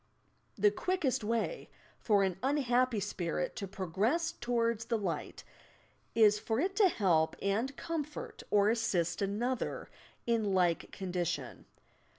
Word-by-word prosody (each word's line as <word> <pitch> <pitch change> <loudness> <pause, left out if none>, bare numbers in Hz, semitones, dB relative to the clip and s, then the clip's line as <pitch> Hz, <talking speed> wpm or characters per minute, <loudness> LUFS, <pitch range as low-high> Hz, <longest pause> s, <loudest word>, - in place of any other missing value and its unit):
The 205 0 +4
quickest 310 - -1
way 230 - -2 0.3
for 205 -3 +3
an 190 -2 -1
unhappy 255 -4 +2
spirit 175 -2 -2
to 195 - -4
progress 200 - 0
towards 235 -2 -1
the 230 - 0
light 180 -7 -4 0.7
is 210 -2 +5
for 225 +2 -1
it 380 +5 0
to 405 -3 +6
help 170 - +2
and 225 +8 -1
comfort 305 -3 -5
or 205 0 +4
assist 215 -8 0
another 225 +6 -2 0.3
in 220 -4 +1
like 175 -2 +1
condition. 180 -3 -3
220 Hz, 125 wpm, -32 LUFS, 195-255 Hz, 0.7 s, to